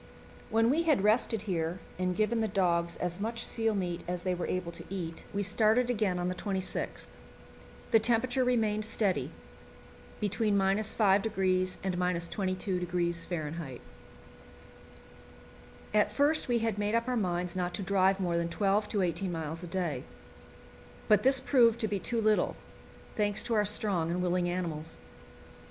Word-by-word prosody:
When 225 +2 +3
we 315 +4 +2
had 305 - +2
rested 215 0 +2
here 170 -4 -2 0.2
and 180 -1 0
given 215 +3 +1
the 220 - +1
dogs 170 -4 +1
as 180 +1 -3
much 230 +3 -3
seal 225 -2 0
meat 175 -3 -2
as 180 0 -3
they 185 - 0
were 175 -1 -3
able 180 -2 -2
to - - -8
eat, 170 -4 -5
we 200 0 -1
started 225 +5 +3
again 210 -6 0
on 175 0 -1
the 180 - -1
26th. 190 0 -3 0.9
The 225 - +6
temperature 245 +3 +2
remained 220 -4 +1
steady, 210 -3 0 0.9
between 210 0 +1
5° 195 -2 +2
and 190 -1 -1
22° 175 -3 -2
F. - - -11 2.1
At 210 -1 +3
first 295 +2 +2
we 240 -1 +2
had 225 -3 -1
made 210 +2 0
up 230 +1 0
our 250 - 0
minds 180 -4 -1
not 180 -1 -2
to 200 - -3
drive 190 0 +2
more 175 -3 0
than 170 0 -1
twelve 205 +4 +1
to 205 -3 0
eighteen 180 +1 -1
miles 160 0 -4
a 175 - -7
day; 170 -7 -2 1.0
but 210 - +5
this 265 +1 +5
proved 240 -3 +4
to 220 - +1
be 205 -1 -2
too 235 +4 -1
little, 215 -1 +2 0.6
thanks 205 -1 +1
to 235 - -2
our 210 -1 +3
strong 190 -5 +1
and 180 +1 -1
willing 180 0 +1
animals. 165 -3 -4
195 Hz, 155 wpm, -30 LUFS, 180-220 Hz, 2.1 s, The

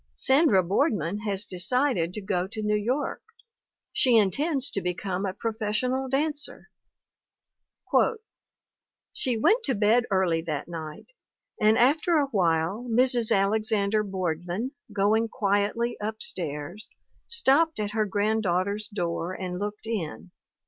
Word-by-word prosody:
Sandra 265 - +4
Boardman 195 - 0
has 205 -1 -2
decided 185 - 0
to 210 - -4
go 185 -2 -1
to 215 +2 -6
New 210 0 +1
York. 245 +8 -1 0.7
She 245 -3 +4
in 200 -3 +4
tends 285 - -1
to 195 - -1
become 180 +2 -2
a 185 - -3
professional 230 +4 -2
dancer. 295 +2 -2 2.4
"She 250 -3 -1
went 440 - +3
to 265 - 0
bed 220 +4 +3
early 185 -4 +1
that 155 -3 -4
night; 160 - -8 0.5
and 215 +1 +5
after 310 +7 +3
a 290 - +3
while 180 +2 0
Mrs. 240 -1 +3
Alexander 215 0 +2
Boardman, 185 - -3 0.2
going 215 +3 +2
quietly 205 +3 0
up 215 +1 -4
stairs, 165 +4 -5 0.4
stopped 320 - +3
at 210 -1 -2
her 215 -1 0
granddaughter's 205 0 0
door 175 -3 -3
and 180 -1 -5
looked 210 +1 -5
in. 185 -5 -4
210 Hz, 125 wpm, -26 LUFS, 185-240 Hz, 2.4 s, and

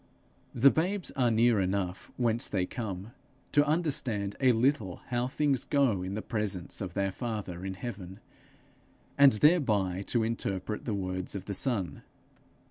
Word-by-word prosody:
The 135 +3 +6
babes 185 +4 -1
are 125 -2 +2
near 115 -1 +4
enough 95 -1 -2
whence 120 -1 +1
they 95 -2 0
come, 100 -1 -5 0.4
to 145 - +5
understand 140 - 0
a 130 -2 +5
little 115 -6 +1
how 120 0 0
things 140 -1 0
go 135 -10 +2
in 95 +2 -4
the 110 - -4
presence 105 -5 -3
of 95 -3 -5
their 100 0 0
father 100 -6 -5
in 95 0 -4
heaven, 95 -3 -7 1.0
and 140 -2 +7
thereby 105 - +3
to 120 -2 +1
interpret 105 -2 -2
the 110 - -1
words 95 -1 -3
of 95 -1 -5
the 100 - -4
Son. 95 - -1
110 Hz, 150 wpm, -30 LUFS, 95-125 Hz, 1.0 s, and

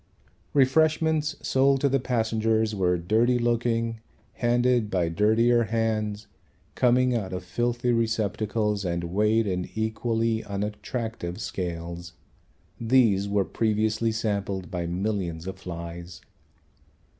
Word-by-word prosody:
Refreshments 155 +2 +3
sold 135 +1 +3
to 145 - +3
the 135 0 +2
passengers 110 -2 0
were 90 -3 +1
dirty 110 +8 +2
looking, 115 -1 0 0.3
handed 120 -2 +2
by 90 -4 0
dirtier 115 +6 +3
hands, 110 -2 -1 0.5
coming 125 0 +3
out 95 -5 -3
of 90 0 -4
filthy 120 +5 -1
receptacles 110 -2 0
and 85 -1 -2
weighed 105 +6 +2
in 90 -2 -2
equally 110 +1 -1
unattractive 105 -1 -4
scales. 85 -3 -5 0.7
These 115 -5 +3
were 100 -1 +1
previously 110 +1 0
sampled 100 -5 -2
by 85 -2 -3
millions 90 -2 -2
of 95 0 -6
flies. 85 0 -8
110 Hz, 110 wpm, -26 LUFS, 95-120 Hz, 0.7 s, Refreshments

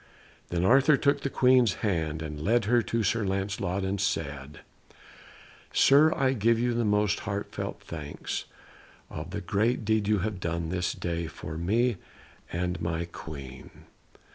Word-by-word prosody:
Then 85 +1 0
Arthur 135 +6 +5
took 140 0 +2
the 140 - -1
Queen's 125 -7 +4
hand 80 -5 -1
and 75 -1 -6
led 115 +6 +2
her 120 +3 +4
to 115 0 -1
Sir 110 +2 +1
Lancelot 95 -1 -2
and 95 0 -1
said, 70 -6 -3 1.1
"Sir, 150 +3 +6
I 135 -1 +2
give 115 -1 +2
you 120 +1 +1
the 120 0 0
most 105 -1 +2
heartfelt 100 -1 -4
thanks 75 -3 -5 0.7
of - - -6
the - - -4
great 115 +3 0
deed 110 -1 +1
you 105 0 +3
have 105 -3 -3
done 85 -2 -2
this 90 0 -1
day 85 -1 -3
for 80 0 -8
me 110 +7 +1 0.5
and 90 0 -2
my 85 0 -1
Queen." 70 -6 -9
100 Hz, 150 wpm, -28 LUFS, 85-115 Hz, 1.1 s, Sir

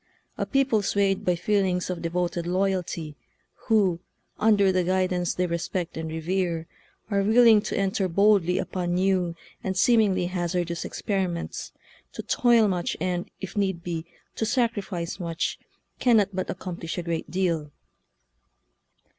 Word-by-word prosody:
A - - -3
people 270 -6 +2
swayed 200 -1 +1
by 180 - +2
feelings 185 0 +1
of 175 -2 -5
devoted 175 0 -2
loyalty, 180 -4 -1 0.5
who, 200 -7 +3 0.4
under 205 -3 +4
the 185 -1 +1
guidance 180 -1 0
they 180 - +1
respect 170 0 -3
and 160 0 -4
revere, 165 +1 -1 0.5
are 200 -1 +2
willing 220 +1 +6
to - - -3
enter 195 0 +1
boldly 195 -1 +3
upon 175 -1 -2
new 185 -2 +1 0.3
and 190 -1 -2
seem 235 +4 +5
ingly 190 -4 +2
hazardous 175 -1 -2
experiments, 185 -4 -3 0.4
to - - -6
toil 235 -3 +4
much 180 -3 -1
and, 180 +1 -2
if 190 - -6
need 190 -4 0
be, 170 -1 -4 0.3
to - - -1
sacrifice 210 -8 -1
much, 170 -2 -2 0.4
cannot 225 -6 +4
but 185 0 -3
accomplish 175 -3 -5
a 175 - -2
great 165 -1 -3
deal 170 -5 -1
185 Hz, 140 wpm, -26 LUFS, 170-200 Hz, 0.5 s, willing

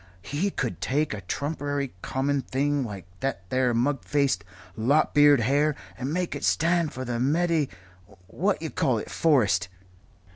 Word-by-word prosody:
"He 145 - -1
could 125 - -3
take 145 +1 0
a 105 - -5
trumpery 145 - -3
common 135 +1 0
thing 140 +2 0
like 100 -6 -7
that 135 -9 -3
there 130 -1 +2
mug 135 +3 +1
faced, 140 -9 +1 0.3
lop 140 +9 +2
eared 145 -3 +6
hare 145 +5 +2 0.2
and 130 +2 -4
make 180 +1 -1
it - - -6
stand 170 -1 +2
for 130 - -5
the 120 -1 -2
medi 155 +2 +2 0.6
what - - 0
you - - -3
call - - +1
it - - -6
forest. 105 - +2
140 Hz, 155 wpm, -26 LUFS, 125-150 Hz, 0.6 s, eared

